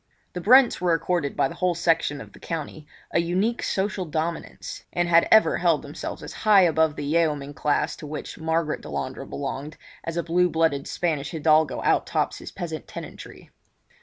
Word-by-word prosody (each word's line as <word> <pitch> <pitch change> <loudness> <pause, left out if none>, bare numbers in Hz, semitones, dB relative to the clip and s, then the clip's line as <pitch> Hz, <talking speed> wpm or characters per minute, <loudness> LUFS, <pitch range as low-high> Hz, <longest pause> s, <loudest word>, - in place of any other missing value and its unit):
The 180 - -4
Brents 250 +4 +5
were 175 -2 +3
accorded 165 -2 -1
by - - +3
the - - -8
whole 180 -1 0
section 165 -4 +1
of - - -12
the - - -15
country 155 -2 -6 0.2
a - - +2
unique 185 +8 0
social 195 0 -1
dominance, 165 +1 -4
and 175 0 0
had 170 0 +5
ever 220 - +6
held 170 -4 +2
themselves 145 +1 -7
as - - -8
high 210 -2 +6
above 160 -3 +3
the 145 - -5
yeoman 150 -2 0
class 145 0 0
to 150 - -9
which 150 +1 -7
Margaret 160 -1 -1
Delandre 70 -2 -5
belonged, 135 - -5 0.3
as 165 0 -4
a 170 - 0
blue 180 +2 +2
blooded 160 -4 +1
Spanish 155 -5 -1
hidalgo 155 -1 +2
out - - +2
tops - - -1
his - - -9
peasant 160 -3 -6
tenantry. - - -10
165 Hz, 180 wpm, -25 LUFS, 150-175 Hz, 0.3 s, ever